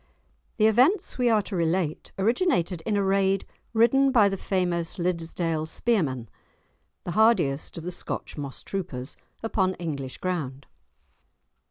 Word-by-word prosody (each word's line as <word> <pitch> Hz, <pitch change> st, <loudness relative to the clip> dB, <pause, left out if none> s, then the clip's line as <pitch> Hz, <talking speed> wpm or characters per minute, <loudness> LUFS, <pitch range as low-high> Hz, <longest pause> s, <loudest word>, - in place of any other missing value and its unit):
The 215 Hz, -, +4 dB
events 265 Hz, -, +3 dB
we 245 Hz, -1 st, +3 dB
are 215 Hz, -2 st, +3 dB
to 195 Hz, -, -5 dB
relate 165 Hz, -1 st, -1 dB
originated 195 Hz, -, +1 dB
in 210 Hz, -2 st, +1 dB
a 200 Hz, -, +2 dB
raid 195 Hz, 0 st, +2 dB, 0.3 s
ridden 255 Hz, +5 st, +4 dB
by 215 Hz, -6 st, +5 dB
the 195 Hz, -, -2 dB
famous 180 Hz, -2 st, -1 dB
Liddesdale 165 Hz, -2 st, -1 dB
spearmen 150 Hz, -, 0 dB, 0.8 s
(the 175 Hz, -, -4 dB
hardiest 180 Hz, -12 st, +2 dB
of 165 Hz, -, -6 dB
the 180 Hz, -, -4 dB
Scotch 175 Hz, -, -5 dB
moss 140 Hz, -3 st, -7 dB
troopers) 145 Hz, -9 st, -5 dB, 0.3 s
upon 190 Hz, -4 st, +1 dB
English 140 Hz, -6 st, -5 dB
ground. 140 Hz, -7 st, -3 dB
185 Hz, 135 wpm, -26 LUFS, 165-220 Hz, 0.8 s, by